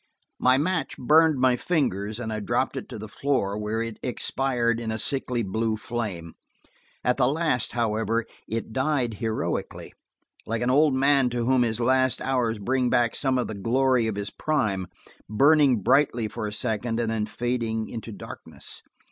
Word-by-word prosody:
My 130 Hz, +1 st, +4 dB
match 165 Hz, +4 st, -1 dB
burned 155 Hz, +3 st, +4 dB
my 130 Hz, -1 st, +4 dB
fingers 110 Hz, -, -1 dB
and 110 Hz, -2 st, -4 dB
I 110 Hz, -, -2 dB
dropped 105 Hz, -, -1 dB
it -, -, -6 dB
to -, -, -7 dB
the 110 Hz, +1 st, -7 dB
floor, 105 Hz, -4 st, -1 dB
where 105 Hz, +2 st, -2 dB
it 115 Hz, -1 st, -7 dB
expired 120 Hz, -2 st, 0 dB
in 115 Hz, -1 st, -4 dB
a 110 Hz, -, -2 dB
sickly 125 Hz, -1 st, -1 dB
blue 110 Hz, +3 st, -1 dB
flame. 105 Hz, -8 st, -5 dB, 0.7 s
At 125 Hz, +1 st, +2 dB
the 130 Hz, -2 st, +3 dB
last, 150 Hz, -4 st, 0 dB
however 115 Hz, 0 st, 0 dB, 0.2 s
it 115 Hz, 0 st, -4 dB
died 130 Hz, -3 st, 0 dB
heroically–like 115 Hz, 0 st, -5 dB
an 125 Hz, -, +2 dB
old 145 Hz, 0 st, +4 dB
man 135 Hz, -1 st, +3 dB
to 120 Hz, -1 st, -2 dB
whom 130 Hz, 0 st, +3 dB
his 115 Hz, -1 st, +1 dB
last 130 Hz, +1 st, +2 dB
hours 125 Hz, -4 st, 0 dB
bring 125 Hz, +5 st, 0 dB
back 120 Hz, -1 st, +2 dB
some 130 Hz, -2 st, +1 dB
of 125 Hz, -, 0 dB
the -, -, -5 dB
glory 120 Hz, +3 st, +2 dB
of 110 Hz, -, -2 dB
his 100 Hz, +1 st, -3 dB
prime, 105 Hz, -, -1 dB, 0.4 s
burning 135 Hz, -1 st, +4 dB
brightly 125 Hz, -4 st, +3 dB
for 105 Hz, 0 st, -5 dB
a -, -, -4 dB
second 115 Hz, +1 st, -2 dB
and 115 Hz, -1 st, 0 dB
then 110 Hz, -1 st, -1 dB
fading 115 Hz, -2 st, -2 dB
into 115 Hz, -1 st, -7 dB
darkness. 100 Hz, -, -9 dB
120 Hz, 170 wpm, -25 LUFS, 110-130 Hz, 0.7 s, My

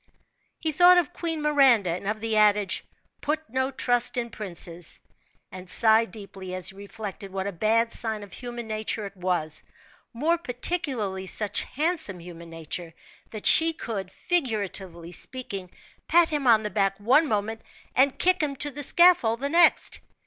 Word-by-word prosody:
He 315 Hz, -, -1 dB
thought 355 Hz, +4 st, +6 dB
of 355 Hz, 0 st, 0 dB
Queen 325 Hz, -3 st, -3 dB
Miranda, 265 Hz, -, +4 dB
and 180 Hz, +3 st, -5 dB
of 215 Hz, +1 st, -3 dB
the 225 Hz, -1 st, -2 dB
adage, 210 Hz, -2 st, +2 dB, 0.4 s
"put 310 Hz, +2 st, -3 dB
no 260 Hz, +1 st, -1 dB
trust 245 Hz, -2 st, +1 dB
in 235 Hz, -1 st, -3 dB
princes," 175 Hz, -5 st, -1 dB, 0.5 s
and 185 Hz, 0 st, -10 dB
sighed 220 Hz, +2 st, +4 dB
deeply 190 Hz, -2 st, -9 dB
as 185 Hz, 0 st, 0 dB
he 195 Hz, -, -12 dB
reflected 200 Hz, -1 st, -8 dB
what 190 Hz, 0 st, -4 dB
a 200 Hz, -, -3 dB
bad 225 Hz, +5 st, +1 dB
sign 220 Hz, -2 st, +2 dB
of 200 Hz, -3 st, -13 dB
human 240 Hz, -1 st, -7 dB
nature 215 Hz, 0 st, -3 dB
it 200 Hz, 0 st, -9 dB
was 175 Hz, -4 st, -2 dB, 0.5 s
more 320 Hz, +8 st, 0 dB
particularly 245 Hz, -, -2 dB
such 210 Hz, +2 st, 0 dB
handsome 310 Hz, -, -1 dB
human 170 Hz, -1 st, -11 dB
nature 165 Hz, +1 st, -6 dB, 0.3 s
that 215 Hz, -2 st, -9 dB
she 325 Hz, 0 st, +6 dB
could, 200 Hz, -, -6 dB
figuratively 200 Hz, -, -2 dB
speaking, 200 Hz, -3 st, -3 dB, 0.4 s
pat 340 Hz, 0 st, +4 dB
him 295 Hz, -4 st, -2 dB
on 220 Hz, -2 st, +5 dB
the 210 Hz, -, -4 dB
back 195 Hz, -1 st, 0 dB
one 265 Hz, +10 st, +3 dB
moment, 220 Hz, 0 st, -2 dB, 0.3 s
and 270 Hz, +1 st, +3 dB
kick 370 Hz, 0 st, +3 dB
him 290 Hz, -2 st, -1 dB
to 290 Hz, +2 st, +1 dB
the 290 Hz, +2 st, -6 dB
scaffold 315 Hz, -8 st, +4 dB
the 280 Hz, +2 st, -2 dB
next. 340 Hz, +3 st, +4 dB
220 Hz, 165 wpm, -25 LUFS, 195-280 Hz, 0.5 s, thought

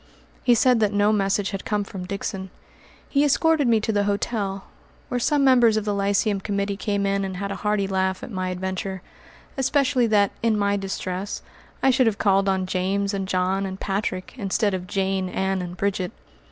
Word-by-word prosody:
He 245 Hz, -2 st, +5 dB
said 250 Hz, 0 st, +4 dB
that 210 Hz, -2 st, +2 dB
no 205 Hz, +1 st, +3 dB
message 195 Hz, -1 st, +1 dB
had 195 Hz, -1 st, -4 dB
come 210 Hz, -1 st, -1 dB
from 190 Hz, -2 st, -7 dB
Dixon. 195 Hz, -1 st, -4 dB, 0.6 s
He 280 Hz, 0 st, +2 dB
escorted 300 Hz, 0 st, +3 dB
me 230 Hz, -2 st, +4 dB
to 220 Hz, -, 0 dB
the 205 Hz, -1 st, +1 dB
hotel, 200 Hz, -1 st, -2 dB, 0.5 s
where 250 Hz, -, -1 dB
some 285 Hz, +3 st, +2 dB
members 240 Hz, -5 st, +5 dB
of 215 Hz, -, -1 dB
the 205 Hz, -, 0 dB
Lyceum 200 Hz, +1 st, +1 dB
Committee 200 Hz, 0 st, -1 dB
came 200 Hz, 0 st, -1 dB
in 195 Hz, 0 st, +1 dB
and 190 Hz, -1 st, -4 dB
had 200 Hz, +1 st, -3 dB
a 195 Hz, -, -4 dB
hearty 210 Hz, -1 st, 0 dB
laugh 190 Hz, -1 st, -1 dB
at -, -, -7 dB
my 185 Hz, -2 st, -2 dB
adventure, 190 Hz, +1 st, -4 dB, 0.5 s
especially 265 Hz, -2 st, +2 dB
that, 205 Hz, -2 st, +3 dB
in 225 Hz, -2 st, +2 dB
my 200 Hz, 0 st, +1 dB
distress, 195 Hz, 0 st, -4 dB, 0.4 s
I 265 Hz, -, +6 dB
should 255 Hz, -1 st, +3 dB
have 215 Hz, -2 st, +1 dB
called 195 Hz, -1 st, +3 dB
on 190 Hz, -1 st, +1 dB
James 195 Hz, +2 st, -1 dB
and 195 Hz, -1 st, -2 dB
John 185 Hz, +1 st, 0 dB
and 190 Hz, 0 st, -5 dB
Patrick, 195 Hz, -2 st, -3 dB
instead 205 Hz, -1 st, 0 dB
of 185 Hz, -1 st, -4 dB
Jane, 190 Hz, -1 st, -1 dB
Ann, 190 Hz, 0 st, -1 dB
and 180 Hz, 0 st, -6 dB
Bridget. 195 Hz, -2 st, -1 dB
200 Hz, 195 wpm, -24 LUFS, 190-215 Hz, 0.6 s, I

